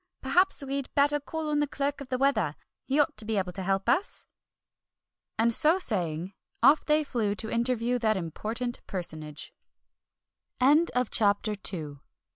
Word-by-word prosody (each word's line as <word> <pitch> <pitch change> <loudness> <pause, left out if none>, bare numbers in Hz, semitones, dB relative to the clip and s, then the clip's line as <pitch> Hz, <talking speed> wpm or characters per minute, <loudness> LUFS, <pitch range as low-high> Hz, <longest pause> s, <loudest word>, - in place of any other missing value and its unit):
Perhaps 365 -4 +2
we'd 275 0 -3
better 290 +1 +4
call 315 +2 -5
on 295 - +1
the 295 - +1
Clerk 285 +1 -2
of 270 - -9
the 255 - 0
Weather, 220 - +1 0.3
he 275 +3 +1
ought 295 +1 +2
to - - 0
be 215 0 -2
able 185 -2 -1
to 190 +2 -6
help 195 +2 -1
us!" 345 +12 0 1.1
And 230 +1 +3
so 315 +9 +4
saying, 180 - -1 0.3
off 280 +5 +6
they 305 0 +2
flew 225 -7 -1
to 220 +1 -6
interview 240 +1 0
that 220 -3 +1
important 220 +8 -4
personage. 155 -5 -6 1.6
CHAPTER 205 0 +2 0.2
III. 150 -6 -6
235 Hz, 150 wpm, -28 LUFS, 195-280 Hz, 1.6 s, off